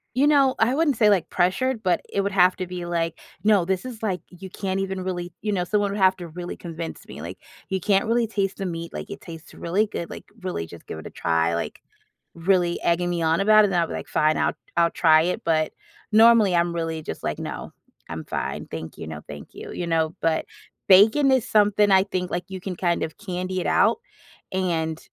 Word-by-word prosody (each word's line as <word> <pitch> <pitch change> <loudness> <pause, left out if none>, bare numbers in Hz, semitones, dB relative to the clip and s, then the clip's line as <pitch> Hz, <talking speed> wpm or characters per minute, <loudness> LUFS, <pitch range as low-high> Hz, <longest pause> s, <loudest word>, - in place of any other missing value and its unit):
you 275 +3 +4
know, 275 -3 +4
I 230 +3 +3
wouldn't 295 -2 +2
say, 215 - +4
like, 195 -5 +2
pressured, 220 +7 0
but 180 -1 +2
it 200 - +1
would 200 0 -2
have 185 -1 +4
to 185 - -4
be, 180 0 -6
like, 165 -1 -2 0.2
"No, 205 -5 +4
this 190 0 -1
is, 245 -4 -8
like, 190 -5 -1
you 185 +1 -11
can't 190 0 -2
even 190 -1 -3
really," 175 -2 -4
you 210 - -2
know? 185 -3 0
Someone 205 +1 0
would 205 - -3
have 190 0 +5
to 175 -2 -8
really 175 +2 -7
convince 165 -1 -7
me, - - -9
like, - - -7 0.3
"You 190 - -1
can't 200 +3 +2
really 230 +1 +2
taste 200 -2 -2
the 195 - -3
meat," 170 -1 -5
like, - - -7
"it 200 - -7
tastes 165 -2 -11
really 195 +6 0
good," 170 -4 -6
like, - - -8 0.2
"really, 180 - -4
just 85 0 -13
give - - -6
it 80 - -9
a - - -7
try," 80 0 0
like, 85 - -4 0.6
really 175 0 +1
egging 175 +1 +1
me 175 -1 -1
on 160 +1 +2
about 215 +1 +6
it, - - 0
then 175 -2 +2
I'd 165 - 0
be - - -6
like, - - -5
"Fine, 155 +1 +2
I'll - - +1 0.2
I'll 170 0 +4
try 160 -2 +5
it." 180 +2 -2
But, 155 -2 +1 0.4
normally, 220 -3 +6
I'm 170 0 +2
really 165 -1 -3
just - - -7
like, - - -2
"No. - - -6 0.4
I'm 80 -1 -6
fine. - - -4
Thank 80 0 -7
you, - - -6
no, 80 -1 -7
thank 75 -1 -10
you." - - -8
You 175 - -4
know? 160 -1 0
But, 160 -1 +1 0.4
bacon 220 +9 +6
is 255 -3 +2
something, 210 -1 +4
I 190 0 +6
think, 180 -2 -3
like, 175 - -2
you 190 -1 -6
can 185 -1 -5
kind 175 -1 0
of 160 - -5
candy-it-out 185 - +1 0.6
and 165 -4 -1
180 Hz, 225 wpm, -24 LUFS, 165-205 Hz, 0.6 s, about